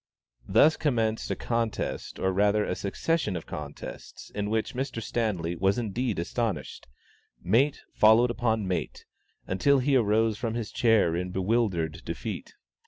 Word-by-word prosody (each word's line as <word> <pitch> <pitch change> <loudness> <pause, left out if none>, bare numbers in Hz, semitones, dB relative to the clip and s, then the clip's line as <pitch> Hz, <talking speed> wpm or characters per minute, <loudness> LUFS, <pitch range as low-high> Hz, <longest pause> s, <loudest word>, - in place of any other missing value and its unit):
Thus 155 +2 +5
commenced 115 -7 0
a - - 0
contest, 115 -2 -2
or 95 - 0
rather 105 +2 +2
a - - -1
succession 105 - -1
of 85 - -5
contests, 75 -1 -8
in 105 0 -3
which 110 0 -1
Mr. 130 -2 -3
Stanley 105 -7 -2
was 95 +4 +1
indeed 120 0 -2
astonished. 90 - -3 0.5
"Mate" 120 - +2
followed 110 +3 +5
upon 110 -4 0
"mate," 90 - -3 0.4
until 140 +10 +3
he 135 +1 +2
arose 110 -2 +2
from 115 -2 -2
his 115 -3 -4
chair 110 -9 +3
in 90 +1 -2
bewildered 90 -4 0
defeat. - - -6
110 Hz, 140 wpm, -27 LUFS, 95-120 Hz, 0.5 s, Thus